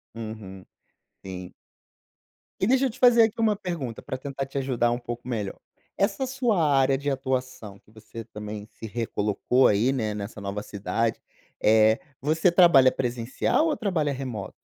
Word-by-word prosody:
Uhum, 110 -4 -8 0.6
sim. 95 -1 -8 1.1
E 190 - +1
deixa 265 +2 +3
eu 260 - +1
te 255 +4 -12
fazer 240 -2 +7
aqui 220 +1 0
uma 215 -2 +3
pergunta, 170 - -5
pra 130 - -5
tentar 135 0 -5
te 135 - -7
ajudar 125 -3 +1
um 120 - -1
pouco 120 +1 -7
melhor. 105 -5 -3 0.4
Essa 200 +6 0
sua 245 -9 +1
área 135 0 +3
de 145 +1 -2
atuação, 130 -6 -3
que - - -26
você 110 +1 -10
também 105 0 -8
se - - -10
recolocou 110 +3 +1
aí, 105 +6 +3
né, 110 -6 -1
nessa 105 +1 -6
nova 100 +1 -4
cidade, 110 +3 -2 0.4
eh, 110 0 +5 0.2
você 160 +5 +2
trabalha 170 -8 +6
presencial 125 - 0
ou 300 - 0
trabalha 165 -9 0
remoto? 130 -7 -5
130 Hz, 160 wpm, -26 LUFS, 110-165 Hz, 1.1 s, fazer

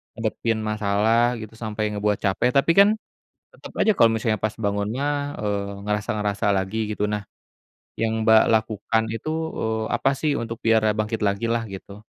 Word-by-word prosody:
ngadepin 115 0 -1
masalah 110 +3 +2
gitu 110 - -8
sampai 110 -1 -3
ngebuat 105 0 -1
capek 100 +5 +2
tapi 140 +4 +4
kan, 200 - +8 0.6
tetap - - -12
aja 215 - +5
kalau 115 - +5
misalnya 110 -2 -1
pas 110 +1 -1
bangunnya, 105 +5 -2 0.3
eee, 100 -1 -3
ngerasa-ngerasa 105 -1 -1
lagi 105 +3 -2
gitu 105 - -1
nah, 105 - -1 0.8
yang 110 0 0
Mbak 110 0 +6
lakukan 110 0 +1
itu, 115 +7 -4 0.3
eee, 110 0 -1
apa 125 +3 +2
sih 140 +1 -1
untuk 115 0 -5
biar 115 -1 +3
e 105 - +3
bangkit 110 +1 -2
lagi 100 +3 0
lah 115 -1 0
gitu? 100 +1 -10
110 Hz, 165 wpm, -23 LUFS, 105-115 Hz, 0.8 s, kan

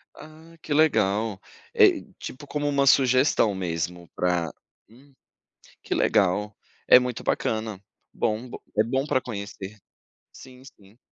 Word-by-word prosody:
Ah, 160 +2 -15
que 150 - -3
legal. 110 -9 +2 0.3
É, 410 -8 +5 0.2
tipo, 145 +3 -9
como 145 0 -2
um 140 -1 +2
sugestão 130 -4 +4
mesmo 85 -1 -4
pra 90 -3 0 0.4
hum, 135 +5 -21 0.7
que - - -2
legal, 105 +1 +1 0.3
é - - +9
muito 125 -2 -4
bacana. 110 -3 -2 0.3
Bom 110 +4 -2
b - - -7 0.2
é 110 - +5
bom 130 +4 -1
para 130 -3 +1
conhecer. 100 -3 -7 0.6
Sim, 130 -1 -14
sim. 105 -6 -18
115 Hz, 130 wpm, -25 LUFS, 100-140 Hz, 0.7 s, é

